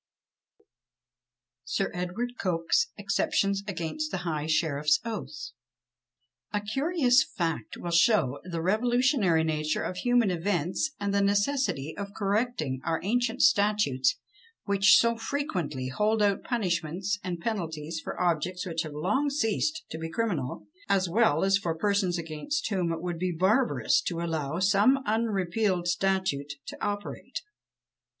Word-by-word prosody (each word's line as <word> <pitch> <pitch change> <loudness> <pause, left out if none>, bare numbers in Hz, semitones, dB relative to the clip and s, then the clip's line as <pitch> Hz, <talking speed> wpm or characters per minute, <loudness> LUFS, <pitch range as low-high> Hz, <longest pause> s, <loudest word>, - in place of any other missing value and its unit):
SIR - - -1
EDWARD 180 +8 -3
COKE'S 180 - +1
EXCEPTIONS 200 -11 0
AGAINST 200 - -3
THE - - -3
HIGH 155 -2 -2
SHERIFF'S 150 -1 +2
OATH. 155 - -5 1.0
A 210 - 0
curious 265 - +2
fact 165 - -2
will 175 - -5
show 170 - +3
the 170 -2 -4
revolutionary 220 - +2
nature 155 -1 -1
of 180 - -4
human 245 -2 +2
events, 175 - 0
and 200 -1 -1
the 200 - +3
necessity 200 - 0
of 200 0 -7
correcting 200 - -1
our 165 - 0
ancient 245 +4 +1
statutes, 205 - +3 0.5
which 200 -1 +5
so 235 0 +3
frequently 185 - -3
hold 210 +9 +1
out 200 -1 +2
punishments 190 -3 -1
and 180 -2 -3
penalties 165 -6 -3
for - - -6
objects 180 +2 0
which 165 -2 -2
have 155 -3 -6
long 265 - +1
ceased 290 +4 0
to 160 - -5
be 165 0 -4
criminal; 160 - -2 0.2
as 195 -2 +3
well 175 -4 +3
as 195 0 +3
for 170 -4 -2
persons 195 -1 +1
against 165 - -3
whom 180 -4 0
it 165 0 -4
would 175 -2 -3
be 185 0 0
barbarous 220 +9 +2
to 170 -2 -3
allow 160 -3 -2
some 200 +8 +4
unrepealed 205 -4 0
statute 175 -6 0
to - - -7
operate. 205 0 -4
190 Hz, 135 wpm, -28 LUFS, 165-220 Hz, 1.0 s, which